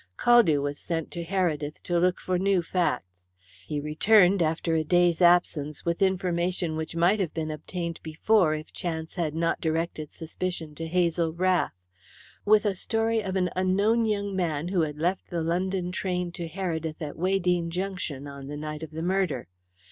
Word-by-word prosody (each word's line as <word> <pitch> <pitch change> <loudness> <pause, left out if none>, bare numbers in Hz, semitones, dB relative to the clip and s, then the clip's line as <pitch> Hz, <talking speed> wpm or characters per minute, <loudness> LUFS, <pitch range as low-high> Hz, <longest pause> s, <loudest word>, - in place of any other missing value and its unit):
Caldew 205 -13 +5
was 145 0 -3
sent 165 -2 -3
to 170 - -4
Heredith 165 -5 -1
to 175 -1 +1
look 180 +1 +2
for 180 -1 -1
new 190 -2 +2
facts. 125 - -2 0.5
He 150 - -2
returned 180 +6 +4
after 165 +1 0
a 160 -1 +2
day's 175 +2 +3
absence 170 -4 +3
with 170 +1 -1
information 180 -3 0
which 160 +1 -4
might 175 +5 +3
have 180 -5 -2
been 155 -1 -2
obtained 170 +2 -5
before 160 +1 +2
if 155 0 -8
chance 160 -2 -4
had 160 -4 -2
not 165 0 0
directed 160 -1 -2
suspicion 165 -1 -5
to 165 +2 -5
Hazel 170 -1 +1
Rath: 180 - +1 0.7
with 210 0 +5
a 205 - +2
story 225 +3 0
of 190 -2 -4
an 180 -2 +1
unknown 200 +5 +2
young 205 -2 -1
man 165 -3 -1
who 185 -2 +1
had 150 -2 -2
left 175 +4 -1
the 170 -2 -2
London 180 +2 -1
train 180 -1 -2
to 170 -1 -5
Heredith 165 -3 -3
at 150 -2 -5
Weydene 180 -1 +1
Junction 180 -6 -4
on 140 -1 -8
the 145 +1 -5
night 150 0 -5
of 160 - -6
the 160 +1 -5
murder. 180 - 0
170 Hz, 175 wpm, -27 LUFS, 160-185 Hz, 0.7 s, Caldew